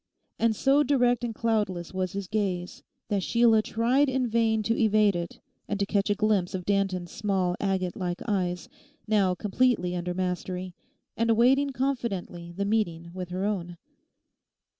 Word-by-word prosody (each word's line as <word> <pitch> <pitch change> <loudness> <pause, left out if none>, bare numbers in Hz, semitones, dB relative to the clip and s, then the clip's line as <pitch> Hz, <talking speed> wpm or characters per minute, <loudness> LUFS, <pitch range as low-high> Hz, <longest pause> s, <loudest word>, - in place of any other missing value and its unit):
And 230 -1 +2
so 275 +6 +3
direct 250 -4 +2
and 230 -2 -3
cloudless 210 -7 -1
was 185 -1 -2
his 200 -1 -4
gaze 190 -4 -2 0.3
that 200 -2 +1
Sheila 230 +2 +4
tried 245 +6 +2
in 260 -1 0
vain 225 -1 +1
to 230 +2 +1
evade 215 -3 +3
it 170 -1 -5 0.3
and 205 - -2
to 200 - +1
catch 200 0 0
a 205 - +2
glimpse 205 -4 +1
of 180 -2 -5
Danton's 195 -3 0
small 190 -4 0
agate 190 -2 -1
like 180 -1 -3
eyes, 180 -4 -1 0.4
now 200 -4 +2
completely 205 -2 +1
under 175 0 -3
mastery, 180 0 -3 0.4
and 230 0 0
awaiting 255 +5 +4
confidently 235 -10 -3
the 200 +3 -3
meeting 170 -6 -1
with 180 -1 -6
her 185 +2 -2
own. 175 -4 -3
200 Hz, 160 wpm, -27 LUFS, 180-230 Hz, 0.4 s, Sheila